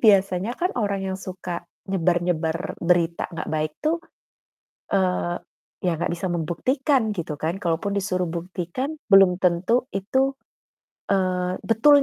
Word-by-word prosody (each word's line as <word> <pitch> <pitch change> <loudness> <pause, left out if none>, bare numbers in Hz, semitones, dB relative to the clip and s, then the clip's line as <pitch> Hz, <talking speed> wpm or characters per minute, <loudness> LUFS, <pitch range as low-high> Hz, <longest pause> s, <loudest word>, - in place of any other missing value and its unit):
biasanya 195 +1 +4
kan 360 +1 0
orang 200 -4 0
yang 190 - -3
suka 180 -2 -5 0.3
nyebar-nyebar 175 -2 0
berita 170 -1 +2
nggak 170 - -5
baik 155 0 0
tuh, 325 +2 +2 0.9
eee, 180 -2 +1 0.5
ya 180 - +3
nggak 170 - -1
bisa 180 +2 -3
membuktikan 245 - +1
gitu 165 -5 -4
kan? 165 +5 -2
Kalaupun 175 +2 0
disuruh 190 -2 0
buktikan 175 - -3 0.2
belum 195 -2 +7
tentu 185 +8 +2
itu, 260 +8 +1 0.8
eee, 185 -2 +1
betul 280 +6 +6
185 Hz, 125 wpm, -24 LUFS, 175-210 Hz, 0.9 s, belum